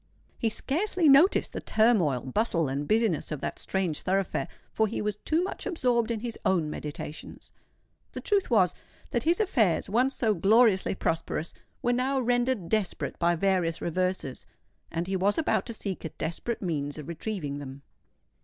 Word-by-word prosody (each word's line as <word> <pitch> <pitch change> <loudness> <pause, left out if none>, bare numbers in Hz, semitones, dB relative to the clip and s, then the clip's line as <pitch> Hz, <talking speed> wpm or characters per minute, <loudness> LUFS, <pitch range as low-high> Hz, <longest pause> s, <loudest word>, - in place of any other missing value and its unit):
He 225 - +1
scarcely 340 - 0
noticed 285 +7 +5
the - - -4
turmoil, 200 - +3
bustle, 165 - 0
and 140 +2 -3
business 215 -8 +1
of 150 - -3
that - - -4
strange 185 -6 -1
thoroughfare; 190 0 0 0.3
for 220 - +2
he 220 - -4
was 210 -1 -2
too 320 +9 0
much 380 - -4
absorbed 245 - +1
in 225 -2 -2
his 235 -1 -5
own 165 -5 +1
meditations. 150 0 -7 0.6
The - - -5
truth 405 -2 +1
was, 195 -8 +4 0.4
that 240 - +1
his 335 +5 +2
affairs—once 245 - +2
so 220 -3 +2
gloriously 200 +1 +4
prosperous—were 165 +8 -3
now 265 +2 +1
rendered 245 -5 +1
desperate 215 -2 -1
by 170 0 +3
various 175 -2 +1
reverses; 180 -6 -2 0.4
and 165 +1 -2
he 190 +1 -2
was 195 +2 +1
about 320 - +1
to 230 - -4
seek 195 -3 -5
a 160 - -3
desperate 170 +10 -4
means 145 -5 -2
of 150 - -8
retrieving 170 -4 -4
them. 140 0 -9
200 Hz, 160 wpm, -28 LUFS, 165-240 Hz, 0.6 s, noticed